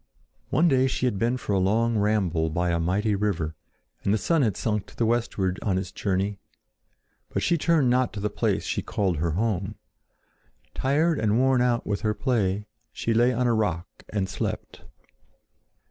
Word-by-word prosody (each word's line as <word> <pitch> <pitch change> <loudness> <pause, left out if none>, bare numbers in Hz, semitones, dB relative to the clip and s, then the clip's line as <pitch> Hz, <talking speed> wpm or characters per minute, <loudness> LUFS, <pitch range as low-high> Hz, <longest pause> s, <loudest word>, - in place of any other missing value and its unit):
One 170 +3 +3
day 130 -3 +3
she 130 - -1
had 105 -6 0
been 120 +3 +1
for 105 - -3
a 95 - +3
long 115 +5 +2
ramble 100 -6 +1
by 85 +2 0
a 85 - +1
mighty 100 +6 +1
river, 95 -6 -1 0.5
and 100 - +1
the 110 - +3
sun 165 +8 +1
had 110 -8 +1
sunk 105 -3 -1
to - - -16
the 115 - +1
westward 110 -5 0
on 95 -3 0
its 95 -1 -3
journey; 100 +1 -1 0.9
but - - -2
she 170 - +3
turned 155 -5 +2
not 125 -1 +2
to 100 - -5
the 105 - 0
place - - 0
she - - -2
called 95 -5 -1
her 80 +1 0
home. 100 -1 -1 1.0
Tired 150 +4 +1
and 110 0 +2
worn 130 0 +3
out 120 -1 +1
with 100 -1 -2
her 105 -1 0
play, 105 -6 0 0.3
she 115 - -1
lay 120 +3 +4
on 125 0 0
a 120 - +3
rock 95 -6 0 0.2
and 100 -3 -1
slept. - - -4
105 Hz, 185 wpm, -26 LUFS, 95-120 Hz, 1.0 s, lay